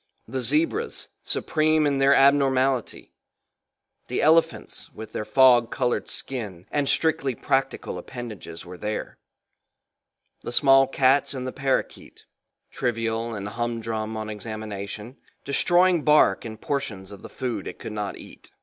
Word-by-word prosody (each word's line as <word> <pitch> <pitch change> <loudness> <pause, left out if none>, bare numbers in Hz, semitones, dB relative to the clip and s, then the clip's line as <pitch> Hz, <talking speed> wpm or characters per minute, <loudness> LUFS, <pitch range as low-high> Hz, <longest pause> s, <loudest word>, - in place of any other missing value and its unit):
The 130 +3 -3
zebras, 330 - 0
supreme 155 0 +1
in 140 -2 +1
their 135 +1 +5
abnormality; 135 -2 +2 0.9
the - - -1
elephants 160 +2 +2
with 110 0 -9
their 110 - -4
fog 125 -2 +5
colored 125 -2 -1
skin 105 -9 -4
and 145 -2 0
strictly 140 -5 +1
practical 135 +1 -1
appendages 105 -9 -8
were 90 0 -10
there, 105 0 -4 1.2
the - - -6
small 135 +1 +5
cats 135 +1 +2
and 130 -1 -4
the 130 - -4
parrakeet 135 -1 -3 0.5
trivial 115 -1 -2
and 100 -1 -5
humdrum 115 -1 -3
on 110 0 -4
examination, 105 +1 -6 0.3
destroying 175 +4 +3
bark 150 -11 +4
and 110 -1 -7
portions 110 -9 -3
of 100 - -11
the - - -10
food 125 -3 -4
it - - -7
could 110 - -7
not 105 -2 -4
eat. - - -13
125 Hz, 130 wpm, -25 LUFS, 110-140 Hz, 1.2 s, their